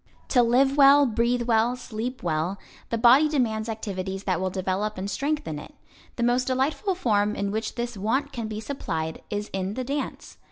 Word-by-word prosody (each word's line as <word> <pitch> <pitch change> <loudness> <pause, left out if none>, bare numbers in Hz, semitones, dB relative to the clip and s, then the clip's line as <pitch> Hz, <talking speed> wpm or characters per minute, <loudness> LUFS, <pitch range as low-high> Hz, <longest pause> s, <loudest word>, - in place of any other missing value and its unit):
To 250 - +5
live 265 +4 +3
well, 285 0 +7
breathe 240 +1 +1
well, 235 +1 +2
sleep 250 +1 -5
well, 170 +3 -1 0.3
the 230 - 0
body 255 +6 +6
demands 230 -6 0
activities 195 -3 -4
that 185 -3 0
will 190 - 0
develop 190 +3 -2
and 190 +1 -3
strengthen 275 - -2
it. 295 - -12 0.4
The 240 - -2
most 245 +1 +2
delightful 280 +9 0
form 210 - +1
in 200 0 -2
which 220 +1 -3
this 240 0 -3
want 255 +8 -1
can 230 -5 -4
be 215 0 -5
supplied 160 - -4
is 205 0 -4
in 190 +1 -2
the 255 - -2
dance. 275 +2 -5
230 Hz, 185 wpm, -25 LUFS, 200-260 Hz, 0.4 s, well